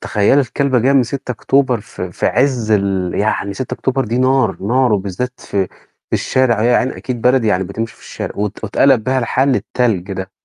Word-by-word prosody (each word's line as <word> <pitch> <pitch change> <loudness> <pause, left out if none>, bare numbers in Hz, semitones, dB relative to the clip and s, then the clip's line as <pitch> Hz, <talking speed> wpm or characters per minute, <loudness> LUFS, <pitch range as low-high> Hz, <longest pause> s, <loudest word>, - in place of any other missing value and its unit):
تخيلي 105 +7 +2
الكلبة 135 0 0
جاية 130 +4 +3
من 135 -2 +5
ستة 125 +2 -5
أكتوبر 130 -1 +1
في 90 -4 -7
في - - -1
عز 125 -4 +1
ال 95 -3 +1
يعني 100 -1 -1
ستة 125 +5 -4
أكتوبر 130 0 -1
دي 115 +3 -2
نار، 130 -5 +2
نار 125 +3 +2
وبالذات 100 +6 -3
في 95 -2 -1 0.4
في - - -31
الشارع 120 -4 +1
يا 120 +1 +4
عيني 130 - -1
أكيد 125 -3 -5
بلد 125 -1 +3
ييعني 95 -3 +1
بتمشي 110 +5 -5
في - - -24
الشارع - - -6
وات 105 +1 -3
واتقلب 120 +2 +3
بيها 130 0 +1
الحال 130 +3 +1
للتلج 110 -7 0
ده. 95 0 -5
120 Hz, 195 wpm, -17 LUFS, 100-130 Hz, 0.4 s, من